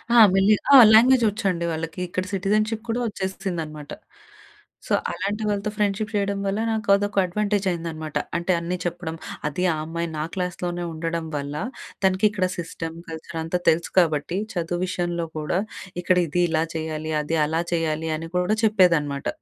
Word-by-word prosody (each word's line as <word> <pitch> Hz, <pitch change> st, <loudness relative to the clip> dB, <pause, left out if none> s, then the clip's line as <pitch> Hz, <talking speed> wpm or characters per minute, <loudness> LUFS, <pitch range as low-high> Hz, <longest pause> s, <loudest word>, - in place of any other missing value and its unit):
ఆ! -, -, +7 dB, 0.2 s
మెల్లి 195 Hz, +2 st, +5 dB, 0.2 s
ఆ! -, -, +11 dB, 0.2 s
లాంగ్వేజ్ 245 Hz, +3 st, +6 dB
వచ్చండి 195 Hz, -5 st, -1 dB
వాళ్ళకి. 165 Hz, +2 st, -4 dB
ఇక్కడ 185 Hz, +1 st, -2 dB
సిటిజన్షిప్ 215 Hz, +3 st, 0 dB
కూడా 230 Hz, +2 st, 0 dB
వచ్చేసిందనమాట. 180 Hz, -7 st, -4 dB, 1.0 s
సో, -, -, 0 dB, 0.2 s
అలాంటి 210 Hz, +2 st, -3 dB
వాళ్ళతో 205 Hz, 0 st, -1 dB
ఫ్రెండ్షిప్ 210 Hz, 0 st, 0 dB
చేయడం 200 Hz, -1 st, 0 dB
వల్ల 195 Hz, +2 st, -1 dB
నాకు 220 Hz, -1 st, -2 dB
అదొక 205 Hz, 0 st, -2 dB
అడ్వాంటేజ్ 205 Hz, +2 st, -1 dB
అయిందనమాట. 160 Hz, -3 st, -5 dB, 0.2 s
అంటే 175 Hz, +2 st, -1 dB
అన్నీ 175 Hz, +2 st, -3 dB
చెప్పడం, 170 Hz, -2 st, -3 dB, 0.3 s
అది 150 Hz, +5 st, -2 dB
ఆ -, -, -2 dB
అమ్మాయి 170 Hz, +1 st, -3 dB
నా 150 Hz, -, -1 dB
క్లాస్‌లోనే 180 Hz, -1 st, -3 dB
ఉండడం 165 Hz, +1 st, -3 dB
వల్ల, 140 Hz, 0 st, -4 dB, 0.5 s
తనకి 190 Hz, +2 st, +3 dB
ఇక్కడ 190 Hz, -3 st, 0 dB
సిస్టమ్, 165 Hz, -1 st, -5 dB
కల్చర్ 160 Hz, +1 st, -7 dB
అంతా 165 Hz, +2 st, -1 dB
తెలుసు 165 Hz, +1 st, +1 dB
కాబట్టి, 160 Hz, 0 st, +1 dB, 0.2 s
చదువు 175 Hz, 0 st, -2 dB
విషయంలో 175 Hz, -2 st, -2 dB
కూడా 155 Hz, +4 st, -1 dB, 0.4 s
ఇక్కడ 180 Hz, +1 st, +2 dB
ఇది 175 Hz, +4 st, 0 dB
ఇలా 160 Hz, 0 st, +2 dB
చేయాలి, 155 Hz, 0 st, -3 dB
అది 160 Hz, +2 st, -1 dB
అలా 160 Hz, +2 st, 0 dB
చేయాలి, 160 Hz, -1 st, -1 dB
అని 165 Hz, +1 st, -7 dB
కూడా 180 Hz, +4 st, +2 dB
చెప్పేదనమాట. 170 Hz, -10 st, +3 dB
175 Hz, 155 wpm, -24 LUFS, 160-200 Hz, 1.0 s, ఆ